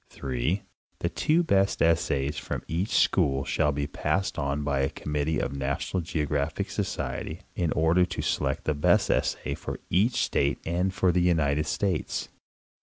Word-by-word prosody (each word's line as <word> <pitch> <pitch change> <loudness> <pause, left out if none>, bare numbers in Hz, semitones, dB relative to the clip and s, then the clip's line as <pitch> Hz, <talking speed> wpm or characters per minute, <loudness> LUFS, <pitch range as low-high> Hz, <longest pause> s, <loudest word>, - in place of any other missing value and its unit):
3. 70 +9 -2 0.3
The - - -1
two 165 +3 +2
best 100 - +2
essays 75 -3 +2
from - - -4
each 90 +7 -1
school 70 -7 +2
shall 75 - +1
be 70 0 -2
passed 75 +6 -1
on 70 +1 -1
by 70 -2 0
a 70 0 +2
committee 75 +2 -2
of - - -1
the 70 - -5
NationaAL 70 +7 -1 0.3
GroGRAPHIC 70 +1 -1
Society 80 +4 -3
in 85 -4 0
order 80 +3 +3
to 90 - -2
select 70 -2 -1
the 75 - +1
best 75 - +3
essay - - 0
for - - -6
each 105 +8 +3
state 70 0 +1
and 90 +3 0
for 95 -1 +2
the 90 +1 +2
United 75 -4 +2
States. 95 -3 -1
80 Hz, 165 wpm, -27 LUFS, 70-90 Hz, 0.3 s, order